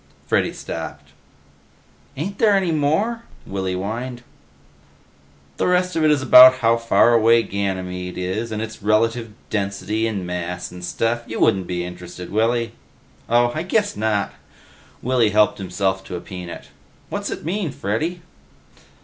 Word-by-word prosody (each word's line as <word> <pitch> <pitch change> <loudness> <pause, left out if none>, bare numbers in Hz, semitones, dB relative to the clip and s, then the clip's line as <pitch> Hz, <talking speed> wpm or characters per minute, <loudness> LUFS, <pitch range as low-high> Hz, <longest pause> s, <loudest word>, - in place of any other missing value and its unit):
Freddy - - +1
stopped. - - -7 1.1
"Ain't 195 +8 -4
there 210 -2 +5
any 190 -3 +1
more?" 160 +11 +1 0.2
Willy 95 -1 -3
whined. 120 +6 -4 1.3
"The - - +1
rest 180 0 +1
of 160 - +1
it 155 - +5
is 145 -2 +2
about 130 0 +9
how 115 -2 +3
far 115 +1 +4
away 115 0 +5
Ganymede 90 -2 -3
is, 95 +6 -3
and 110 0 -2
its 110 0 -8
relative 115 +2 +1 0.2
density 105 +2 -1
and 100 -5 -3
mass 90 0 -4
and 90 0 -10
stuff. 115 +6 -1
You 115 - -5
wouldn't 95 -5 +2
be 90 -1 -2
interested, 90 0 -9
Willy." 115 +2 +1 0.6
"Oh. 120 +1 +4
I 155 - -2
guess 205 +4 0
not." 105 -6 0 0.7
Willy 125 -3 +3
helped 105 +1 +3
himself 95 0 -1
to - - -6
a - - -3
peanut. 90 -1 -9 0.4
"What's - - -3
it - - -6
mean, 185 0 -1
Freddy?" 155 - -2
110 Hz, 145 wpm, -21 LUFS, 95-130 Hz, 1.3 s, about